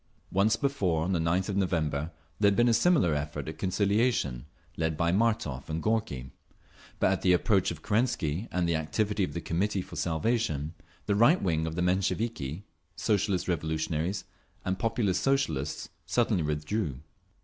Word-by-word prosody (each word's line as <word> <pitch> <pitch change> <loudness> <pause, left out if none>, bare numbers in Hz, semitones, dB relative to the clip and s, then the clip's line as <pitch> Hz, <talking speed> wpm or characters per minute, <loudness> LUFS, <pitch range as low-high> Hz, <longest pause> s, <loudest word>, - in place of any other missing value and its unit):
Once 100 +4 +3
before, 100 - 0
on 90 - -1
the 85 - +1
9th 85 +3 +1
of 100 - -1
November, 80 -6 0 0.3
there 105 - +5
had 100 - +1
been 120 +4 +4
a 120 - +4
similar 115 - +4
effort 75 -1 -3
at 80 0 -6
conciliation, 100 - +1 0.3
led 80 -1 -1
by 85 +1 +2
Martov 95 - 0
and 80 +1 -3
Gorky; 105 - -1 0.7
but - - +3
at - - 0
the 90 - +4
approach 95 +1 +3
of 80 -2 -7
Kerensky 105 - 0
and 90 -1 0
the 85 - +1
activity 100 +7 0
of - - -2
the 85 - -2
Committee 95 +4 -1
for - - -11
Salvation, 80 - 0 0.3
the 105 - +1
right 120 - +5
wing 80 -3 0
of 80 - -4
the 90 - 0
Mensheviki, 95 - -1 0.3
Socialist 100 -3 0
Revolutionaries 80 +2 -1 0.4
and 95 0 -1
Populist 105 -4 +1
Socialists 80 - 0 0.2
suddenly 115 -6 +2
withdrew. 75 - -2
90 Hz, 160 wpm, -29 LUFS, 80-105 Hz, 0.7 s, there